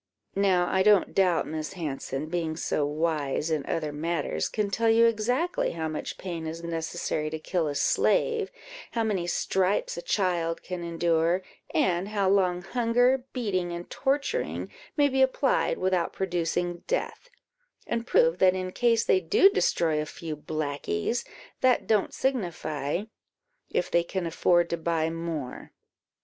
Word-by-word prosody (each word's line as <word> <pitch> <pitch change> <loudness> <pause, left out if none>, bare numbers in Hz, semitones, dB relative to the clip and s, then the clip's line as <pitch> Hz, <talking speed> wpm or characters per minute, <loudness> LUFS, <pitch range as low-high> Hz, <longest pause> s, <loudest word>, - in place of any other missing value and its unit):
Now 190 -3 +3
I 190 - +2
don't 205 -2 +4
doubt, 185 -3 +3
Miss 155 0 -4
Hanson, 150 -4 -4
being 160 -1 -2
so 150 - 0
wise 150 0 -1
in 155 -3 0
other 155 -3 -1
matters, 165 +1 -1
can 210 -2 -1
tell 230 +3 +2
you 230 +1 +6
exactly 245 +10 +1
how 160 -1 -3
much 155 -1 -5
pain 170 -4 -5
is 165 +1 -6
necessary 165 -2 -2
to 160 - -4
kill 160 +1 -1
a 145 - -3
slave, 460 - +2 0.4
how 230 - +1
many 195 -6 -1
stripes 190 +2 0
a - - -3
child 175 -4 0
can 180 -2 -5
endure, 170 +1 +1 0.3
and 180 +1 +1
how 205 -2 0
long 185 -2 +2
hunger, 245 +3 +2
beating, 190 -8 -1
and 170 0 -7
torturing, 285 - -1 0.3
may 290 -1 +5
be 265 -1 +1
applied 265 0 +2
without 185 -2 0
producing 175 -1 -1
death; - - -2 0.6
and 235 0 -2
prove - - +3
that 185 0 +5
in 185 0 -3
case 230 +1 +2
they 185 - +4
do 280 - +5
destroy 160 - +1
a 150 - -5
few 160 -1 -6
blackies, 150 - -2 0.4
that 255 -2 +3
don't 215 -3 +2
signify, 170 - -1 0.7
if - - -1
they 170 - +4
can 185 +1 -3
afford 175 +1 +3
to 170 - 0
buy 165 -1 0
more." 165 -6 -5
175 Hz, 150 wpm, -27 LUFS, 165-215 Hz, 0.7 s, you